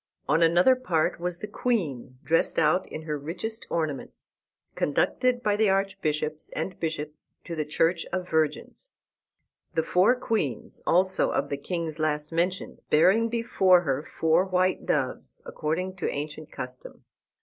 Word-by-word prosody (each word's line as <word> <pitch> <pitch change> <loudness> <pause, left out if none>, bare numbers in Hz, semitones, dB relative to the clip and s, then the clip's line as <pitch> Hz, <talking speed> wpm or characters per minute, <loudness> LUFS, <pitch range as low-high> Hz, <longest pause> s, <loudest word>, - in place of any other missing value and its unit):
On 165 - +3
another 175 +9 +5
part 170 -14 0
was 175 0 -3
the 210 - -6
queen, 155 - -2
dressed 165 +1 +2
out 165 +3 +2
in 155 - -6
her 150 -2 -3
richest 185 +10 -5
ornaments, 155 -5 -3 0.4
conducted 245 - +1
by 210 -1 +2
the 215 -1 +3
archbishops 175 -6 -1
and 165 +4 -4
bishops 155 -2 -5
to 170 - -5
the 155 -1 -2
Church 165 +3 +1
of 185 -1 -2
Virgins; 160 - -1 0.9
the 160 - +2
four 185 +9 +4
queens, 210 - -2
also, 185 +2 +3
of - - -1
the 140 - -2
kings 165 +1 -4
last 150 0 -1
mentioned, 175 +3 -1
bearing 195 +9 +4
before 195 -6 +4
her 140 -4 -1
four 160 +3 +2
white 185 -1 0
doves, 135 -4 -1
according 180 +5 -2
to 180 - -1
ancient 150 +1 -5
custom. 125 0 -8
165 Hz, 145 wpm, -27 LUFS, 150-190 Hz, 0.9 s, another